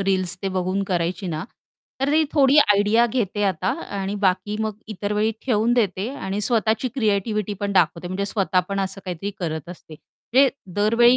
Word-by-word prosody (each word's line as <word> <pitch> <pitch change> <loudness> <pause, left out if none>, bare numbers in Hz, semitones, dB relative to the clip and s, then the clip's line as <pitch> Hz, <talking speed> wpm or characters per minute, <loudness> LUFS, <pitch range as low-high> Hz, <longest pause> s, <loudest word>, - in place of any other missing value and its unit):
Reels, 185 -2 +1
ते 195 - 0
बघून 185 +2 -1
करायची 175 +1 -1
ना. 160 -1 -3 0.6
तर 275 +1 +1
ती 315 +1 +4
थोडी 280 -1 +4
आयडिया 210 -1 +4
घेते 215 -4 -1
आता 185 -1 0 0.3
आणि 195 +1 -2
बाकी 190 +3 +1
मग 215 -1 -2
इतर 205 -1 -3
वेळी 210 +1 +2 0.2
ठेवून 230 -1 +2
देते 205 -3 0
आणि 195 -5 -3
स्वतःची 225 +2 +1
क्रिएटिव्हिटी 210 -3 0
पण 200 -1 -1
दाखवते. 175 -1 +2
म्हणजे 190 +2 -2
स्वतः 195 -3 +1
पण 195 0 -1
असं 195 0 -3
काहीतरी 185 +2 -4
करत 160 -3 -4
असते, 175 -2 -11
म्हणजे 265 - +1 0.3
दरवेळी 230 +4 +5
200 Hz, 170 wpm, -23 LUFS, 185-220 Hz, 0.6 s, दरवेळी